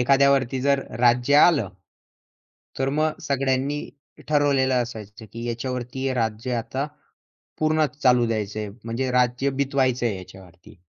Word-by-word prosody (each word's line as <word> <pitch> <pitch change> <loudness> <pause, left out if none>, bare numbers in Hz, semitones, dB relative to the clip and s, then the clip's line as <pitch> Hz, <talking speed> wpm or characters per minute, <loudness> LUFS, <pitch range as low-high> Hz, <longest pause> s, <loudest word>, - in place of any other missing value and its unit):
एखाद्यावरती 135 0 +3
जर 140 0 +2 0.2
राज्य 125 +3 +3
आलं, 145 - +5 1.1
तर 135 - 0
मग 155 +2 0
सगळ्यांनी 135 +1 0 0.5
ठरवलेलं 135 -4 +2
असायचं 110 -2 -9
की 115 +1 -6
याच्यावरती 125 +2 -4
हे 130 - 0
राज्य 115 +1 -2
आता 130 +4 -3 0.7
पूर्णच 155 -1 +1
चालू 125 -2 +4
द्यायचंय, 105 -1 -3 0.2
म्हणजे 120 +3 -2
राज्य 125 +2 +1
बितवायचंय 130 -5 0
याच्यावरती. 95 +1 -14
130 Hz, 115 wpm, -24 LUFS, 115-140 Hz, 1.1 s, आलं